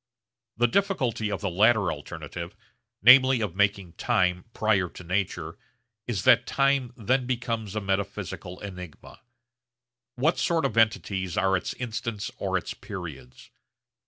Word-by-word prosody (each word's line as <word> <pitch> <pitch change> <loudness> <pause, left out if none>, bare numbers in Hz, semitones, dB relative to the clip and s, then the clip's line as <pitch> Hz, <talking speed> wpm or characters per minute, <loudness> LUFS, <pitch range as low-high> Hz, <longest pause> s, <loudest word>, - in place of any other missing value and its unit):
The 120 - +4
difficulty 130 - 0
of 100 - -3
the 100 - -1
latter 105 0 +3
alternative 80 +4 -7 0.5
namely 130 +2 +8
of 105 -6 -3
making 100 -3 +1
time 90 -1 +1
prior 100 -6 +1
to 90 - -11
nature 90 -2 -2 0.5
is 115 -5 -2
that 130 -3 +5
time 135 -3 +1
then 125 +3 0
becomes 115 -4 -3
a 110 - -1
metaphysical 95 -2 -3
enigma. 90 -5 -9 1.0
What 150 +7 +1
sort 165 -1 +1
of 110 - -1
entities 100 -5 +1
are 95 0 +3
its 90 - -3
instants 115 -3 -4
or - - 0
its - - -5
periods? 90 - -9
100 Hz, 130 wpm, -26 LUFS, 90-120 Hz, 1.0 s, namely